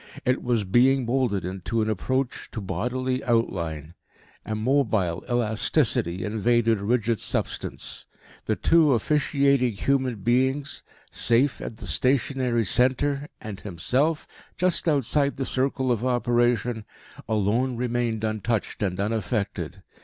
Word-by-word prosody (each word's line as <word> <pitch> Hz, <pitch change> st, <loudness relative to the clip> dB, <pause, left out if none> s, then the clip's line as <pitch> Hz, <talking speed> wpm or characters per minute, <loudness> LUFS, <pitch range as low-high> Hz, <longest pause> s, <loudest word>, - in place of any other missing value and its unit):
It 125 Hz, +1 st, +1 dB
was 120 Hz, -3 st, 0 dB
being 125 Hz, +6 st, +3 dB
moulded 115 Hz, -7 st, 0 dB
into 95 Hz, +5 st, -2 dB
an -, -, -2 dB
approach 130 Hz, +5 st, -2 dB
to 115 Hz, -, -4 dB
bodily 125 Hz, +7 st, -2 dB
outline. 85 Hz, -, -1 dB, 0.5 s
A 110 Hz, -, -2 dB
mobile 110 Hz, -7 st, +1 dB
elasticity 110 Hz, -, +1 dB
invaded 115 Hz, +1 st, +1 dB
rigid 115 Hz, 0 st, +1 dB
substance. -, -, -3 dB, 0.4 s
The -, -, +1 dB
two 155 Hz, -5 st, +4 dB
officiating 140 Hz, -1 st, +2 dB
human 130 Hz, +3 st, 0 dB
beings, 130 Hz, +6 st, 0 dB, 0.3 s
safe 125 Hz, +4 st, +2 dB
at 110 Hz, -, -6 dB
the -, -, -9 dB
stationary 130 Hz, -3 st, +1 dB
centre, 140 Hz, +6 st, +1 dB
and 105 Hz, -3 st, -7 dB
himself, 130 Hz, -, 0 dB, 0.3 s
just 180 Hz, -1 st, +2 dB
outside 140 Hz, 0 st, +1 dB
the 135 Hz, -, -3 dB
circle 130 Hz, 0 st, 0 dB
of 120 Hz, -1 st, 0 dB
operation, 120 Hz, -2 st, +1 dB, 0.5 s
alone 110 Hz, +4 st, +1 dB
remained 120 Hz, -2 st, -1 dB
untouched 110 Hz, 0 st, -2 dB
and 95 Hz, -2 st, -1 dB
unaffected. 105 Hz, 0 st, -2 dB
120 Hz, 115 wpm, -25 LUFS, 110-130 Hz, 0.5 s, two